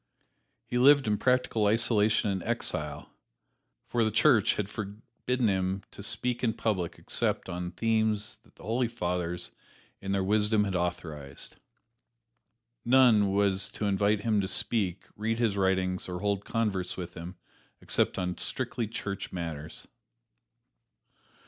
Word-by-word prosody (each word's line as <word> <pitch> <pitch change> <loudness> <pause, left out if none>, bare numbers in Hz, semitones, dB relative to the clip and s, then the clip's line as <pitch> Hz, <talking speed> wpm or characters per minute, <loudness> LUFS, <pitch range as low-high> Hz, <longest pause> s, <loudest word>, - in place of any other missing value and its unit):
He 125 - -1
lived 140 +2 +6
in 105 -1 0
practical 125 -4 +2
isolation 110 -1 +3
and 95 -1 -2
exile, 75 -10 -2 0.7
for 120 -1 0
the 110 - +2
Church 110 0 +4
had 105 - -2
forbidden 110 +4 -3
him 95 0 0
to - - -10
speak 125 +4 +1
in 115 -2 +2
public 95 -8 -1
except - - -1
upon 90 -1 -4
themes 110 0 0
that - - -27
the - - -16
Holy 115 +4 0
Fathers 90 -5 -3 0.5
in 95 - -4
their 100 -1 +1
wisdom 105 +2 +3
had 100 -2 -2
authorized. 80 -5 -4 1.3
None 120 -6 +5
was 100 0 +2
to 105 - -3
invite 100 +1 +2
him 105 -2 +2
to 95 - -2
speak, 95 -3 0
read 110 +2 -1
his 115 -4 +1
writings 95 -1 0
or 90 0 -4
hold 100 -1 -1
converse 100 -6 -1
with 90 -1 -6
him, 90 +2 -8 0.4
except - - 0
on 90 -2 -2
strictly 115 -3 -2
church 100 -2 -5
matters. 80 -4 -5
100 Hz, 135 wpm, -29 LUFS, 95-110 Hz, 1.3 s, lived